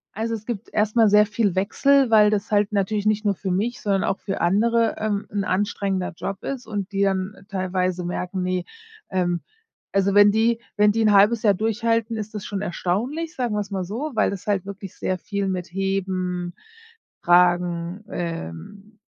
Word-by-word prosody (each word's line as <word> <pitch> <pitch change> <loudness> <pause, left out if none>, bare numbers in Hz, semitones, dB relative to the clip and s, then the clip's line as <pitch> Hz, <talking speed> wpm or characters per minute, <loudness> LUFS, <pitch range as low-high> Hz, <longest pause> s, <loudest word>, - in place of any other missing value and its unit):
Also, 225 +1 -2
es 215 - -9
gibt 230 -5 -5
erstmal 215 +1 +3
sehr 210 +1 +6
viel 205 -3 0
Wechsel, 270 +7 +3
weil 210 -1 +6
das 210 0 -2
halt 205 0 +2
natürlich 205 +1 0
nicht 215 0 +1
nur 205 -1 +2
für 190 +1 -5
mich, 220 +7 -1
sondern 195 -2 +1
auch 195 - -1
für 195 - -4
andere, 230 +6 +2
ähm, 210 -1 -2
'n 200 -1 -1
anstrengender 195 -1 -1
Job 195 +1 -5
ist 270 -3 -5
und 205 -2 -4
die 195 0 -1
dann 190 +1 0
teilweise 185 -1 -1
merken, 180 +1 -3
ne, 180 -1 -1 0.4
ähm 175 -2 0 0.5
also, 195 0 +2
wenn 205 0 +7
die 225 +2 +2 0.2
wenn 210 0 +4
die 225 +1 0
'n 215 -2 +4
0,5 210 +3 +5
Jahr 205 -2 +5
durchhalten, 225 +2 0
ist 215 0 -6
das 210 - -6
schon 200 -1 -4
erstaunlich, 235 - -2
sagen 245 -4 -1
wir's 205 -1 -3
mal 190 -2 -2
so, 255 - -4
weil - - +2
das 200 +1 -7
halt 195 -3 0
wirklich 195 -1 -8
sehr 185 - -2
viel 200 +1 -3
mit 185 -1 -3
Heben, 185 -2 -2 0.7
Tragen, 175 +1 +2
ähm, 175 - -6
200 Hz, 180 wpm, -23 LUFS, 185-215 Hz, 0.7 s, wenn